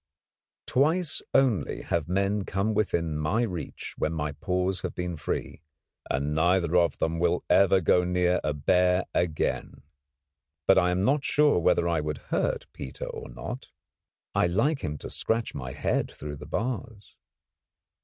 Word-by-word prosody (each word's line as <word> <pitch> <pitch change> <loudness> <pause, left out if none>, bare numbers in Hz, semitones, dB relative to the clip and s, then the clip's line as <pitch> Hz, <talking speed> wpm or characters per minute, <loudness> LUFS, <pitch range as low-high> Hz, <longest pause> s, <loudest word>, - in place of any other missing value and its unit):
Twice 160 +5 +1
only 125 - +2
have 80 -3 -1
men 100 +2 +1
come 100 +4 -1
within 85 -7 0
my 90 +11 +1
reach 90 -8 -5
when 80 - 0
my 75 -2 -2
paws 90 +4 -1
have - - -4
been 90 -1 -3
free, 75 0 -4 0.5
and 70 +3 0
neither 85 +2 +2
of 85 -4 +3
them 80 +1 -1
will 85 0 +1
ever 95 -1 +5
go 90 +2 +4
too - - -2
near 90 0 +2
a 75 - +1
bear 90 +5 +2
again. 80 -5 -1 0.8
But - - +6
I 90 -1 +2
am 90 +2 +1
not 140 +3 +2
sure 150 -7 +3
whether 85 0 +3
I 85 -2 +1
would 75 -1 -3 0.2
hurt - - 0
Peter 65 - -7
or - - -7
not. - - -7 0.7
I - - +3
like 135 - +1
him 75 -1 -3
to - - -8
scratch 115 0 -1
my 65 -3 -5
head - - -1
through 75 0 -7
the 75 +1 -10
bars. 115 +2 -4
90 Hz, 160 wpm, -27 LUFS, 80-100 Hz, 0.8 s, But